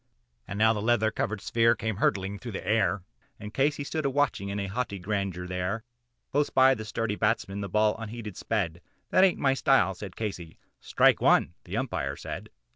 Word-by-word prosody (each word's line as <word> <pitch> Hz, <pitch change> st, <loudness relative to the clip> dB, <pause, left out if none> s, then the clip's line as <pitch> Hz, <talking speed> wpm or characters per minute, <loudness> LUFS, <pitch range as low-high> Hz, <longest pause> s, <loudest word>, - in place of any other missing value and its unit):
And 100 Hz, -, -5 dB
now 110 Hz, +1 st, +5 dB
the 105 Hz, -, -3 dB
leather 110 Hz, -1 st, +2 dB
covered 105 Hz, -1 st, -2 dB
sphere 115 Hz, +2 st, +3 dB
came 110 Hz, -2 st, -3 dB
hurtling 100 Hz, -1 st, 0 dB
through 115 Hz, +1 st, -7 dB
the -, -, -6 dB
air, 105 Hz, -3 st, +2 dB, 0.4 s
And 105 Hz, +1 st, -8 dB
Casey 145 Hz, +1 st, +1 dB
stood 155 Hz, +2 st, -3 dB
a 140 Hz, -, +1 dB
watching 135 Hz, -8 st, 0 dB
it 100 Hz, -, -3 dB
in 100 Hz, -1 st, -3 dB
haughty 105 Hz, -1 st, -3 dB
grandeur 95 Hz, -2 st, -3 dB
there; 90 Hz, +4 st, -3 dB, 0.5 s
Close 145 Hz, +1 st, +1 dB
by 130 Hz, 0 st, +5 dB
the 110 Hz, -4 st, -6 dB
sturdy 105 Hz, 0 st, -2 dB
batsman 105 Hz, -2 st, 0 dB
the 100 Hz, -, -4 dB
ball 105 Hz, 0 st, +2 dB
unheeded 115 Hz, -3 st, -6 dB
sped 90 Hz, -6 st, -2 dB, 0.3 s
"That 185 Hz, -, +5 dB
hain't 190 Hz, -2 st, +4 dB
my 135 Hz, -2 st, +2 dB
style," 135 Hz, -9 st, +3 dB
said 95 Hz, 0 st, -9 dB
Casey 95 Hz, -7 st, -5 dB, 0.2 s
"Strike -, -, +3 dB
one," -, -, +4 dB
the -, -, -4 dB
Umpire 70 Hz, +1 st, -2 dB
said. -, -, -7 dB
105 Hz, 195 wpm, -28 LUFS, 100-120 Hz, 0.5 s, now